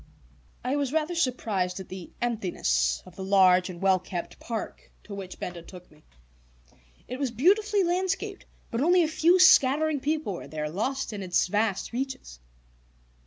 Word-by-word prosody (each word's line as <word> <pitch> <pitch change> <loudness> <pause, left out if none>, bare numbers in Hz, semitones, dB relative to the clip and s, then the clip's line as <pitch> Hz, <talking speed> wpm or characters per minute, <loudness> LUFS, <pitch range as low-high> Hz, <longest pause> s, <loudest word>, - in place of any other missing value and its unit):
I 260 +3 0
was 280 -3 -1
rather 315 +2 0
surprised 215 - -1
at 190 - -8
the 185 -2 -8
emptiness 170 - 0
of 185 - -15
the 190 - -6
large 185 -1 +4
and 175 -2 -8
well 190 0 +3
kept 180 -1 -6
park 230 -2 -6
to 210 - -10
which 195 -2 -7
Benda 175 -1 -6
took 180 +1 -13
me. 150 0 -21 1.1
It 255 +1 -6
was 275 -2 0
beautifully 395 - +2
landscaped, 380 +3 -2 0.2
but 230 - -1
only 350 +4 +4
a - - +1
few 335 +3 +3
scattering 310 -4 +5
people 300 -5 -1
were 175 - -8
there, 150 +1 -4
lost 265 - -2
in 205 - -5
its 180 -2 +1
vast 205 +2 -1
reaches. 250 - -5
225 Hz, 165 wpm, -27 LUFS, 185-310 Hz, 1.1 s, scattering